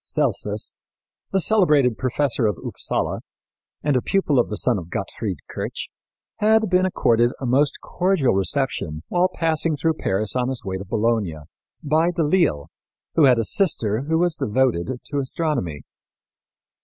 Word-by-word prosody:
Celsus, - - -2 0.6
the 195 - +2
celebrated 150 - +3
professor 130 -1 0
of 105 -5 -1
Upsala, - - -2 0.6
and 145 -2 +1
a 125 - +2
pupil 155 -7 +1
of 120 - +1
the 105 - -2
son - - +2
of 85 -1 -10
Gottfried 95 0 -4
Kirch, - - -5 0.5
had 220 -1 +3
been 185 +1 +4
accorded 120 -8 +2
a 135 - -4
most 140 +4 +2
cordial 180 -8 +1
reception, 95 - -1
while 180 +1 +2
passing 160 -2 0
through 160 +2 +1
Paris 105 -7 -2
on 125 0 0
his 130 -3 -4
way 95 -1 -3
to 95 - -8
Bologna, 110 -5 0 0.5
by 155 +4 +2
De 170 -2 0
L'Isle 150 - +1 0.4
who 160 - +5
had 125 -3 +5
a 115 - +1
sister 115 - +2
who 160 - +3
was 175 -1 +1
devoted 120 - 0 0.2
to 145 - -2
astronomy. 130 - -2
130 Hz, 155 wpm, -22 LUFS, 110-165 Hz, 0.6 s, who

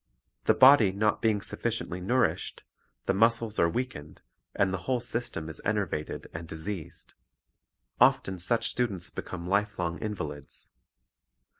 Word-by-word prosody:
The - - +4
body 130 -7 +7
not 105 +3 +1
being 110 -3 +2
sufficiently 110 -5 -3
nourished, 120 +5 0 0.4
the - - +2
muscles 115 +1 +2
are 85 - +4
weakened, 100 - -5 0.4
and 95 -1 +2
the 95 - -1
whole 125 -1 +2
system 115 -9 -3
is 80 - -7
enervated 100 -7 -2
and 80 +1 -6
diseased. 80 +2 -6 0.9
Often 95 -1 +3
such 115 +6 +1
students 105 -8 -2
become 85 -2 -6
lifelong 95 -3 0
invalids. 75 -10 -6
100 Hz, 125 wpm, -28 LUFS, 85-115 Hz, 0.9 s, body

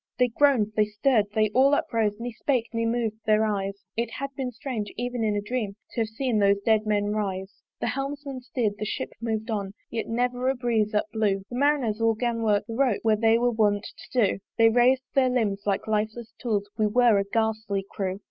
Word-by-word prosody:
They 250 0 +3
groan'd, 235 -4 +3
they 215 - +4
stirr'd, 210 +1 +2
they 215 -1 +2
all 270 +5 +5
uprose, 220 -6 0
Ne 240 +1 -4
spake, 245 0 -1
ne 230 0 0
mov'd 225 -2 -1
their 215 0 +4
eyes: 200 -2 -3
It 235 0 -1
had 275 0 -4
been 260 -2 -2
strange, 230 -4 -5
even 245 0 -2
in 210 -1 +1
a 205 - 0
dream 210 -3 -3 0.2
To 235 - -2
have 225 - 0
seen 225 0 -1
those 200 0 +4
dead 220 -1 +3
men 205 -1 +1
rise. 195 -2 -4 0.2
The - - 0
helmsman 275 0 -4
steerd, 230 -4 -2
the 215 - -2
ship - - -3
mov'd 225 0 -2
on; 200 -2 -3 0.2
Yet 230 -1 -3
never 245 +2 0
a 265 - +1
breeze 230 -4 0
up 210 - +2
blew; 205 -3 +1
The - - -4
Marineres 255 -5 +1
all 225 0 +3
'gan 235 0 -1
work 210 -2 +2
the 225 - -6
ropes, 250 -3 +1
Where 220 -1 +4
they 225 +1 +4
were 245 +1 +2
wont 210 -3 +2 0.3
to 245 -4 +3
do: 195 - -1 0.2
They 225 0 +6
rais'd 250 +3 +4
their 265 -2 +4
limbs 210 -5 -1
like 195 -1 0
lifeless 220 +2 -2
tools 210 -4 -1
We 215 - +3
were 230 -1 +4
a - - +1
ghastly 220 -1 -1
crew. 190 -2 -3
225 Hz, 215 wpm, -26 LUFS, 210-245 Hz, 0.3 s, They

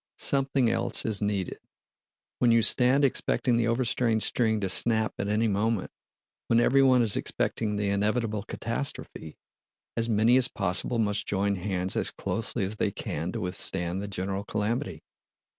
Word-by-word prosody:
Something 135 -2 +1
else - - -1
is 110 -2 -1
needed. 100 -3 -2 0.8
When 120 -2 +4
you 115 -1 +4
stand 130 +4 +4
expecting 125 -1 0
the 115 -1 +1
overstrained 115 -2 +1
string 110 -3 +1
to 95 - 0
snap 110 +3 +1
at 100 - -2
any 105 +2 +1
moment, 105 0 -1 0.6
when 115 - +3
everyone 130 0 +4
is 110 -3 +2
expecting 105 -2 -2
the 100 -1 -1
inevitable 105 +1 0
catastrophe, 115 - -4 0.6
as 115 0 0
many 110 +3 +4
as 130 -1 +6
possible 95 +3 -1
must 105 -2 -1
join 100 0 0
hands 95 0 -3
as - - -1
closely 115 -1 -3
as 100 +3 -3
they 105 - +1
can 85 -3 -4
to 115 - -4
withstand 90 0 -1
the 100 - -5
general 95 0 -3
calamity. 110 +6 -3
110 Hz, 155 wpm, -27 LUFS, 100-120 Hz, 0.8 s, as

